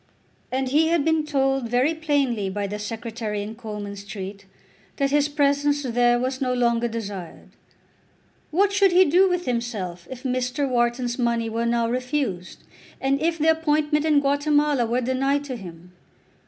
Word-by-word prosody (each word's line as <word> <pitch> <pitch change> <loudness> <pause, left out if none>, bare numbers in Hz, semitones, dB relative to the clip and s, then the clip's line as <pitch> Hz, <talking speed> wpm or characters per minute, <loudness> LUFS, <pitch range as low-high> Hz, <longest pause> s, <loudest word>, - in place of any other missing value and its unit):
And 260 0 -1
he 310 +4 +3
had 330 -3 +1
been 320 -1 +2
told 270 -4 0
very 250 +6 +2
plainly 280 -10 0
by 200 +1 -3
the 205 +1 -5
Secretary 220 -1 -4
in 215 +2 -6
Coleman 210 -3 -7
Street 200 -1 -8 0.5
that 275 -1 0
his 295 0 +2
presence 290 0 +1
there 240 -1 +2
was 260 +1 -2
no 255 -1 0
longer 240 -1 +1
desired. 205 -6 -7 1.0
What 395 +5 +2
should 395 -1 +4
he 370 +1 +6
do 365 +5 +4
with 360 0 -1
himself 210 -8 -3
if 260 -1 -8
Mr. 255 +2 -1
Wharton's 240 0 0
money 235 -2 0
were 230 +1 -1
now 235 0 +1
refused, 250 - -3 0.4
and 275 +1 0
if 330 +1 +1
the 320 +1 +4
appointment 305 -1 +1
in 300 -2 +3
Guatemala 290 -2 +2
were 240 +2 0
denied 270 +3 0
to 270 -3 -5
him? 180 -4 -11
255 Hz, 160 wpm, -24 LUFS, 230-290 Hz, 1.0 s, he